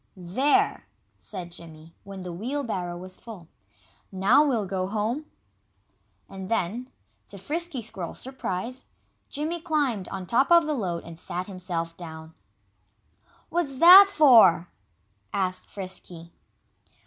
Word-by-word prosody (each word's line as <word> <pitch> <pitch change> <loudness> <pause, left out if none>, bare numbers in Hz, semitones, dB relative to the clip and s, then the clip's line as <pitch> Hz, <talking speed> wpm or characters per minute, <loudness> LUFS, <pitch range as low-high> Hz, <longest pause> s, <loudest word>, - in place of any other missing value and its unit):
"There!" 270 - +1 0.3
said 180 -4 -9
Jimmy, 165 -1 -12
when 195 -1 -9
the 180 -1 -6
wheelbarrow 210 -5 -3
was 185 +1 -7
full. 210 -8 -11 0.6
"Now 200 +10 +4
we'll 240 -8 0
go 185 -1 -2
home." 220 +9 -2 1.0
And 190 0 -8
then, 230 +3 -1 0.4
to 200 - -10
Frisky 300 - -3
Squirrel's 185 -5 -6
surprise, 255 -1 -5 0.4
Jimmy 315 +4 -3
climbed 290 - -1
on 190 -2 -6
top 255 - +2
of 340 -1 +7
the 305 - -1
load 180 -10 -3
and 165 -1 -10
sat 180 +1 -4
himself 175 -4 -5
down. 160 -2 -10 1.2
"What's 315 -5 -2
that 370 +6 +10
for?" 225 - +6 0.6
asked 185 -1 -2
Frisky. 180 -3 -8
200 Hz, 120 wpm, -26 LUFS, 180-270 Hz, 1.2 s, that